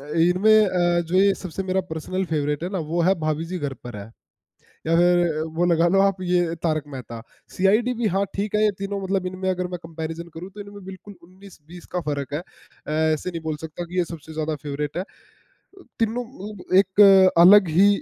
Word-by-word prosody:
अ, 140 - -12
इनमें 205 +6 +4
अ, 175 -2 +1
जो 170 +2 -2
ये 195 +1 +4
सबसे 185 0 -6
मेरा 190 0 0
पर्सनल 185 +4 -3
फेवरेट 150 0 -1
है - - -2
ना, 195 - -2
वो 165 +2 -1
है 190 +3 +4
भाभी 155 +1 -1
जी 180 +2 -4
घर 145 -4 -4
पर 120 -3 -7
हैं 105 +2 -10 0.7
या 165 - +2
फिर 175 -2 +3
वो 175 - +2
लगा 170 -1 +3
लो 195 +3 +3
आप 195 -1 +2
ये 175 -2 +1
तारक 155 -3 0
मेहता, 120 -3 -8 0.3
सीआईडी 215 +6 +2
भी 230 - +1
हाँ, 195 +1 0
ठीक 205 +1 -3
है, 210 - +2
ये 210 - +4
तीनों 200 0 -4
मतलब 190 -1 -1
इनमें 185 +1 -4
अगर 180 -1 -2
मैं 180 -1 -5
कंपैरिज़न 165 +1 -6
करूँ 175 +4 -8
तो 210 - -9
इनमें 200 -1 -10
बिल्कुल 190 +2 -10
उन्नीस-बीस 180 -2 -15
का - - +1
फ़र्क 145 -1 -3
है। 150 - -1
अ, 175 - -16 0.2
ऐसे 155 +4 -5
नहीं 170 -2 -6
बोल 155 -1 -3
सकता 160 +2 -6
कि 175 +2 -6
ये 180 - +3
सबसे 160 -1 -10
ज़्यादा 155 0 -2
फेवरेट 145 +1 -4
है। - - -1 0.5
अ, 390 -1 -21 0.2
तीनों 230 +2 -1
मतलब 205 -4 -5
एक 195 -1 +6
अलग 195 -1 +7
ही 200 - +7
180 Hz, 215 wpm, -23 LUFS, 160-195 Hz, 0.7 s, अलग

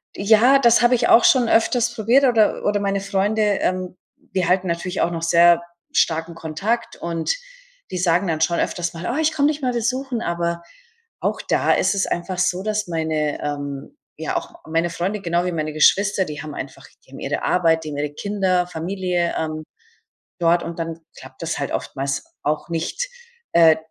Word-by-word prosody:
Ja, 225 +7 +5
das 240 -2 +5
habe 240 +1 +5
ich 235 -1 +2
auch 230 - +6
schon 245 -3 +4
öfters 240 +1 +2
probiert 235 +5 +3
oder 230 -4 +3
oder 205 0 +2
meine 200 -1 -1
Freunde, 200 +2 0 0.2
ähm, 185 0 -1 0.4
die 185 -3 +1
halten 185 +1 +2
natürlich 175 +2 -2
auch - - +2
noch 165 -1 -4
sehr 170 +1 +5 0.3
starken 165 +1 0
Kontakt, 195 +10 -3
und 170 - -2 0.5
die 185 - -4
sagen 180 +2 +2
dann 160 -2 -1
schon 170 +2 +2
öfters 170 -1 -2
mal: 170 +6 -4
„Oh, 255 - -2
ich 315 0 +2
komm 290 -2 +2
dich 300 0 -1
mal 250 -2 0
besuchen.“ 245 +1 -2
Aber 170 -2 -2 0.6
auch - - -2
da - - +2
ist 195 +2 +1
es 195 - +1
einfach 180 +1 -3
so, 180 0 +1
dass 210 -1 -2
meine 160 -3 -1
ähm, 145 -1 -5 0.2
ja - - -3
auch - - -6 0.2
meine 165 +2 0
Freunde 190 +5 -2
genau 175 -1 0
wie 180 - -1
meine 155 -2 -3
Geschwister, 195 +5 +3
die 150 -1 -7
haben 150 - -7
einfach - - -8 0.2
die - - -21
haben - - -10
ihre - - -3
Arbeit, 165 -2 +2
die 155 - -6
haben 145 - -5
ihre 145 0 -3
Kinder, 190 -1 0
Familie, 180 0 -2
ähm, 155 -1 -3 0.7
dort, 170 0 +3
und 170 - -6
dann 165 0 -4 0.2
klappt - - -13
das - - -2
halt - - -3
oftmals 135 0 -3 0.2
auch 150 +3 -2
nicht. 170 - -3 0.4
Äh, 165 -2 +6
180 Hz, 190 wpm, -21 LUFS, 165-210 Hz, 0.7 s, auch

